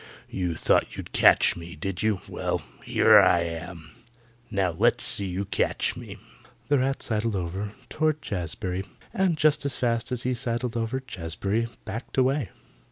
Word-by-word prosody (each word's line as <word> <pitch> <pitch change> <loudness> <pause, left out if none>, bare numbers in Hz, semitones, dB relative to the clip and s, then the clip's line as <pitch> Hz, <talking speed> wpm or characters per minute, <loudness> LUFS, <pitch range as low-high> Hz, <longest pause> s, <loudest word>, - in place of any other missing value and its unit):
You 90 -3 -2
thought - - +1
you'd - - -7
catch - - +5
me, 85 -1 -9
did 90 +4 -4
you? 110 -4 +1
Well, - - -2 0.2
here - - +6
I 85 - +5
am! 85 -1 -6 0.6
Now 95 -3 0
let's 80 - +2
see 100 - +4
you 95 +2 -3
catch 95 0 0
me." - - -9 0.5
The 145 -2 +4
rat 135 +1 0
sidled 110 -1 0
over 95 +3 -4
toward 155 -1 0
Jazbury, 90 - -3 0.3
and 185 -4 +1
just 150 0 +3
as 140 -3 -1
fast 115 -1 0
as 125 -2 0
he 130 - 0
sidled 120 0 -2
over 115 +3 -2
Jazbury 100 +2 -2 0.2
backed 115 +7 -6
away. 130 - +2
105 Hz, 160 wpm, -26 LUFS, 90-130 Hz, 0.6 s, here